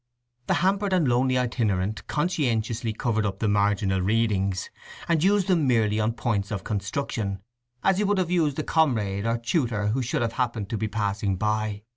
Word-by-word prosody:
The - - +2
hampered 195 0 +1
and 175 -6 +3
lonely 130 +1 +2
itinerant 105 -6 -1
conscientiously 120 - -1
covered 110 -1 -1
up 100 -2 -2
the 110 - -1
marginal 100 -2 +1
readings, 100 -2 0 0.4
and 165 -2 +2
used 200 0 +3
them 170 -7 +2
merely 110 -4 +2
on 110 +1 +1
points 105 -5 -1
of 100 -3 -4
construction, 100 -1 -3 0.4
as 195 0 +3
he - - +2
would 205 0 +1
have 180 -2 0
used 155 -6 +1
a 155 - -1
comrade 110 -12 +1
or 115 +1 +1
tutor 115 - 0
who 125 +5 0
should 120 0 -1
have 115 -1 -2
happened 120 -5 -2
to 115 - -1
be 110 - -1
passing 100 -2 -1
by. 105 +1 -1
115 Hz, 180 wpm, -25 LUFS, 105-140 Hz, 0.4 s, and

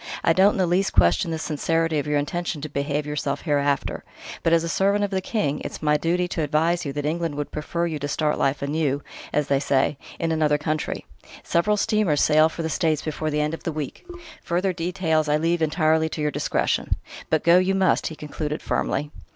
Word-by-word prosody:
I 165 - +4
don't 195 +4 +5
in - - -4
the 185 - +3
least 180 +3 +1
question 90 - +3
the 160 - -2
sincerity 165 0 0
of 145 - -4
your 150 0 +1
intention 165 +2 -2
to 155 - -5
behave 145 +1 -2
yourself 145 -1 -2
hereafter; 145 -3 0 0.4
but 165 - +1
as 165 0 +4
a - - -2
servant 200 +4 +2
of 205 - -1
the 190 -1 0
King, 185 -9 -1
it's - - -6
my 150 0 +3
duty 175 +4 +1
to 165 - -2
advise 160 +3 +1
you 140 - -3
that 145 0 -3
England 165 0 -1
would 145 0 -4
prefer 170 +3 -2
you 160 -3 -3
to 145 - -3
start 150 +1 0
life 135 +1 +1
anew 145 -1 0 0.3
as 150 - +1
they 140 -1 +2
say 135 0 +1 0.2
in 165 -1 -1
another 155 -2 +2
country. 155 +1 -3 0.4
Several 210 +5 +1
steamers 200 -8 +2
sail 155 +1 +5
for 165 - -5
the - - -1
States 155 -1 0
before 155 0 -2
the 150 0 0
end 150 +1 -1
of 165 - -5
the 165 - -3
week: 150 -2 -5 0.4
further 180 +2 0
details 165 -3 0
I 150 - +3
leave 165 +2 0
entirely 160 0 +2
to 155 - -5
your 150 0 +1
discretion. - - 0 0.3
But 160 - +1
go 170 +2 +6
you 190 +1 +1
must," 190 -2 +2
he 160 - -6
concluded 150 0 -5
firmly. 145 +1 -1
155 Hz, 215 wpm, -24 LUFS, 150-170 Hz, 0.4 s, go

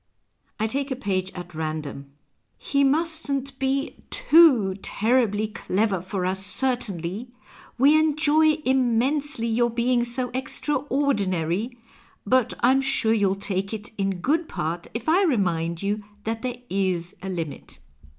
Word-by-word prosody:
I 220 - +1
take 275 +5 -2
a 260 - -2
page 190 -7 -2
at 175 -1 -9
random: 155 -3 -5
— - - -48
" - - -46
He 280 0 +4
mustn't 280 -2 0
be 270 +1 -1
ton 285 - +5
terribly 220 -1 +1
clever 205 -3 -1
for 185 0 -3
us, 190 +1 0
certainly! 205 -3 0 0.5
We 285 +5 +5
enjoy 310 0 +3
inuuensdy 260 0 +1
your 240 0 +2
being 240 +1 +1
so 245 +1 -1
extraordinary: 250 - -1 0.5
but 255 +2 +2
I'm 260 +3 +4
sure 270 -5 +1
you'll 200 -3 +2
take 195 +1 -3
it 210 +1 -7
in 195 -3 -2
good 315 - 0
jiart 165 +3 -3
if 230 0 -5
I 340 +5 +4
remind 170 - 0
you 205 +1 -1 0.2
that 225 +1 -3
there 250 0 -3
is 185 -3 -1
a 190 - -5
limit." 165 - -6
230 Hz, 140 wpm, -24 LUFS, 190-270 Hz, 0.5 s, ton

